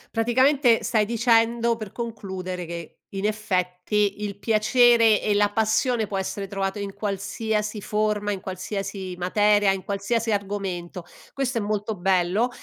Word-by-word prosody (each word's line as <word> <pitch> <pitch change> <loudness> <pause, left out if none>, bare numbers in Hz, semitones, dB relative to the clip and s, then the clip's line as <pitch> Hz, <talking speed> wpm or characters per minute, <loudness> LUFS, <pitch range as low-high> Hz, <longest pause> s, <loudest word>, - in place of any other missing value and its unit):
Praticamente 245 +2 +3
stai 215 -2 +2
dicendo, 235 +1 +2
per 215 -3 -8
concludere, 190 -6 -5
che 170 -1 -8 0.2
in 195 +1 -2
effetti 205 0 -1
il 200 -1 -4
piacere 225 +1 +4
e 210 - 0
la 205 0 +3
passione 220 +2 +1
può 195 -1 -3
essere 195 +1 -4
trovato 195 0 -3
in 200 -1 -5
qualsiasi 210 +1 -2
forma, 210 0 0
in 200 - -3
qualsiasi 190 0 -5
materia, 205 +2 +3
in 190 -1 -3
qualsiasi 215 +3 -1
argomento. 195 -3 -3 0.3
Questo 265 -3 -1
è 225 - 0
molto 210 +1 -2
bello 190 +5 +2
210 Hz, 140 wpm, -24 LUFS, 195-225 Hz, 0.3 s, piacere